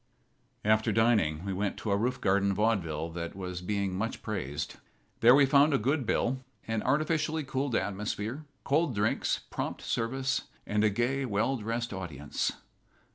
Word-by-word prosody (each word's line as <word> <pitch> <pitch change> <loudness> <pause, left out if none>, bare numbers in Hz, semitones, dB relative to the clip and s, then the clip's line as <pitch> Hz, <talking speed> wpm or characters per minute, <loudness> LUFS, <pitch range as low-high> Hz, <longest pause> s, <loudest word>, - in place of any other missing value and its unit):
After 110 +1 +3
dining 105 -8 +2
we 100 - -2
went 100 +2 -1
to 110 - -3
a - - +4
roof 125 +5 0
garden 100 0 +2
vaudeville 85 -8 0
that 85 0 -5
was 90 -2 -5
being 100 0 -1
much 110 +4 -3
praised. 75 - -4 0.4
There 120 +3 +8
we 140 0 +6
found 140 +2 +5
a - - +4
good 135 +2 0
bill, 130 +3 0 0.2
an 110 -1 0
artificially 155 +3 +1
cooled 135 -2 -1
atmosphere, 105 +7 -2 0.2
cold 145 -2 +1
drinks, 105 +2 +1
prompt - - -4
service, 130 +3 -1 0.2
and 105 0 +1
a 110 - +5
gay, 120 +6 0
well 115 +2 +1
dressed 115 +1 -3
audience. 75 -7 -3
110 Hz, 155 wpm, -30 LUFS, 100-130 Hz, 0.4 s, There